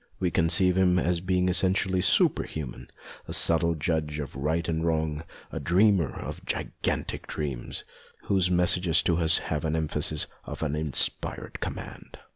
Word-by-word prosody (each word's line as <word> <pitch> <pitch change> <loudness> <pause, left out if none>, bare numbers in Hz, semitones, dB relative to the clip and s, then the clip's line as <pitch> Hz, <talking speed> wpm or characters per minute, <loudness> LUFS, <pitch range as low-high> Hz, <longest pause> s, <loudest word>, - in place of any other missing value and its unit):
We 90 -2 0
conceive 85 +4 +3
him 90 -1 +3
as 90 -1 +1
a - - -12
being 90 0 +1
essentially 95 0 +2
super - - +4
human, 65 -5 -7 0.4
a - - -4
subtle 85 0 +4
judge 75 -1 -2
of 70 -4 -6
right 80 +5 -1
and 80 -1 -1
wrong, 80 -2 -1 0.3
a - - -4
dreamer 95 -3 +3
of - - -7
gigantic - - -3
dreams, 70 -5 -4 0.4
whose 95 -3 +2
messages 90 -1 +3
to 85 - +1
us 80 -1 +3
have 75 -1 -3
the 80 +1 -1
emphasis 75 -1 0 0.2
of - - -6
an 75 -1 -1
inspired 75 -3 -1
command. - - -7
80 Hz, 155 wpm, -27 LUFS, 75-90 Hz, 0.4 s, super